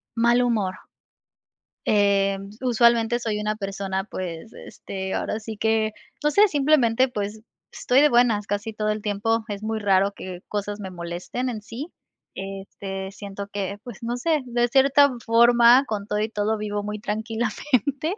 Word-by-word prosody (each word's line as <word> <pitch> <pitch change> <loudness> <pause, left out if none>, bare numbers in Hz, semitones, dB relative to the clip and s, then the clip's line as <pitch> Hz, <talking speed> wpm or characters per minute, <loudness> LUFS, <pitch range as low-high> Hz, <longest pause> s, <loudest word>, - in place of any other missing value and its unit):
Mal 235 +1 +4
humor. 210 -6 0 1.1
Em, 200 -1 +2
usualmente, 235 -1 +3
soy 220 -3 -2
una 210 0 -1
persona, 195 -2 -3
pues, 185 0 -6
este, 190 -1 -6
ahora 220 - -2
sí 220 0 -7
que, 220 0 +1 0.3
no 300 - +3
sé, 410 +6 +6
simplemente, 270 -6 +3
pues, 210 -1 -4 0.3
estoy 255 +2 +2
de 300 - +6
buenas 235 -4 +3
casi 205 +2 -3
todo 215 0 -1
el 215 - -2
tiempo, 215 +2 0
es 205 -1 -5
muy 220 0 -2
raro, 200 -1 +2
que 185 -2 -8
cosas 205 0 -3
me 190 -2 -6
molesten 175 +8 -4
en 220 -4 -5
sí, 245 +8 -7 0.5
este, 195 0 -6
siento 200 0 -7
que, 200 0 -4
pues, 240 -4 -10
no 235 +1 -2
sé, 310 +1 +1
de 240 0 0
cierta 275 +2 +5
forma 235 +2 +6
con 205 -2 -4
todo 210 0 -1
y 215 - 0
todo, 215 0 -1
vivo 205 -1 -3
muy 210 +1 -4
tranquilamente. 240 - -1
215 Hz, 160 wpm, -24 LUFS, 200-240 Hz, 1.1 s, sé